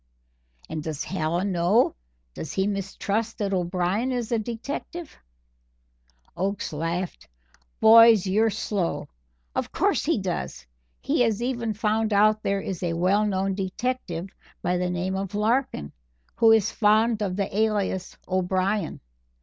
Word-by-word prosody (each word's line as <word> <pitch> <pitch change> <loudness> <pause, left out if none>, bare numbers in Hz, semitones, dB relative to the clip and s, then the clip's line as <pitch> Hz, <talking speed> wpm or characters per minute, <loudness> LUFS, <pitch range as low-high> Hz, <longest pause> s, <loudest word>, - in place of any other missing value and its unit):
"And 160 - -4
does 155 -2 -4
Hallen 175 +2 -1
know, 180 +7 +3 0.4
does 155 - -6
he 190 - +1
mistrust 205 +2 -2
that 200 -3 -1
O'Brien 185 +6 0
is 245 -3 -2
a 230 - +2
detective?" 280 +9 -6 1.2
Oakes 195 -2 -2
laughed. 165 +4 -3 0.5
"Boys, 225 -2 +8
you're 215 +4 +3
slow. 205 -4 -2 0.4
Of - - -2
course - - +1
he - - +1
does. 65 -1 -4 0.4
He - - +1
has 230 -1 +1
even 235 -4 -2
found 220 0 0
out 215 +1 +4
there 200 -1 0
is 185 -3 -5
a 175 -2 -1
well 190 +5 +2
known 195 -1 0
detective 190 -2 -3 0.3
by 180 - +1
the 180 0 -1
name 180 +2 -2
of 195 +1 -4
Larkin 215 - 0 0.4
who 225 -1 +5
is 220 -1 +4
fond 220 +1 +3
of 190 -3 -1
the 195 -1 -2
alias 205 -4 0
O'Brien. 185 +2 0
200 Hz, 135 wpm, -25 LUFS, 180-220 Hz, 1.2 s, Boys